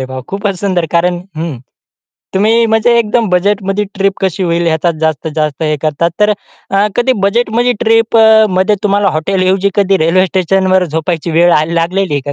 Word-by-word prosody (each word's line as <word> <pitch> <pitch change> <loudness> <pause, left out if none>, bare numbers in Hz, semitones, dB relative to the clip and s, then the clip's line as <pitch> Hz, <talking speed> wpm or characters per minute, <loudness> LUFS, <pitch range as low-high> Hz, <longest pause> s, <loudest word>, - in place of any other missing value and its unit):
अरे, - - -2
वाह, 130 0 -7
खूपच 200 0 -3
सुंदर. 185 -4 -1
कारण 175 +1 +1 0.2
हं. 160 -4 -4 0.8
तुम्ही 220 +4 +2
म्हणजे 225 +2 +2
एकदम 225 0 0
बजेटमध्ये 195 +2 0
ट्रिप 195 0 0
कशी 190 0 -1
होईल 170 -1 0
याचा 165 +1 +1
जास्तीत 160 -1 -2
जास्त 155 -1 -2
हे 155 -1 0
करतात, 155 +2 0
तर 210 - +4 0.4
अ, 195 +2 +2
कधी 245 +2 +2
बजेटमध्ये 235 +3 +1
ट्रिप 225 0 +2
अ, 220 -1 +5
मध्ये 190 +3 +1
तुम्हाला 200 -1 +1
हॉटेलऐवजी 190 +3 0
कधी 195 -1 +2
रेल्वे 185 +3 +2
स्टेशनवर 185 +1 +1
झोपायची 165 +1 -3
वेळ 170 +2 +3
आल 155 +2 -3
लागलेली 180 0 -1
आहे 145 - -1
190 Hz, 170 wpm, -12 LUFS, 170-210 Hz, 0.8 s, अ